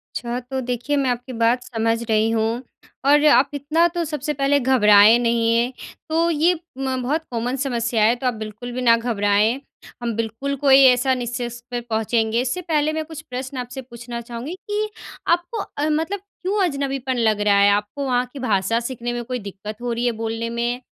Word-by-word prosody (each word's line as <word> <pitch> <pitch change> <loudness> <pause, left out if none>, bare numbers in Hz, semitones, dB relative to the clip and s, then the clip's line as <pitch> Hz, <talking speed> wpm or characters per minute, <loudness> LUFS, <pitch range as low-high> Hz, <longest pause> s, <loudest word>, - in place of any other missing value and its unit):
अच्छा, 240 +1 -3
तो 260 +2 -5
देखिए, 250 +3 -2
मैं 270 -2 +1
आपकी 245 +1 -3
बात 240 +2 +2
समझ 230 -1 -1
रही 220 +1 +3
हूँ 225 +2 0 0.4
और 295 +2 +5
आप 280 -2 +5
इतना 305 +4 +2
तो 340 - 0
सबसे 300 0 -3
पहले 280 +1 +2
घबराए 220 -4 +6
नहीं, 230 -1 +1
ये। 240 +2 +1 0.4
तो 330 +2 +2
ये 330 +3 +3 0.2
म 265 -1 -1
बहुत 305 +6 -1
कॉमन 240 +2 -2
समस्या 235 -4 0
है, 230 +3 +4
तो 255 +1 -3
आप 245 - +1
बिल्कुल 220 +3 -7
भी 255 +1 -4
ना 230 -2 +6
घबराएँ। 220 +1 +1 0.4
हम 235 -2 -2
बिल्कुल 230 +5 -2
कोई 270 0 +6
ऐसा 255 +1 +4
निष्कर्ष 240 -1 -4
पे 240 0 -2
पहुँचेंगे। 225 0 0
इससे 260 +8 -2
पहले 310 -2 0
मैं 315 0 -2
कुछ 315 -1 -9
प्रश्न 260 +2 -5
आपसे 250 +1 -5
पूछना 235 -1 -8
चाहूँगी 240 +8 -6
कि 425 +1 -1 0.4
आपको 345 +6 +1 0.2
अ, 300 +2 0
मतलब 325 +6 -1
क्यों 395 0 -2
अजनबीपन 275 -3 -2
लग 215 -3 +2
रहा 205 -1 +4
है? 200 0 +6
आपको 210 +7 -1
वहाँ 250 -1 +1
की 275 - -7
भाषा 220 -1 +1
सीखने 240 0 -4
में 240 0 -3
कोई 250 +1 -4
दिक्कत 210 +2 -8
हो 245 -1 -2
रही 240 +1 -2
है, 240 - +3
बोलने 225 +1 -3
में? 240 +2 -2
245 Hz, 195 wpm, -22 LUFS, 230-275 Hz, 0.4 s, घबराए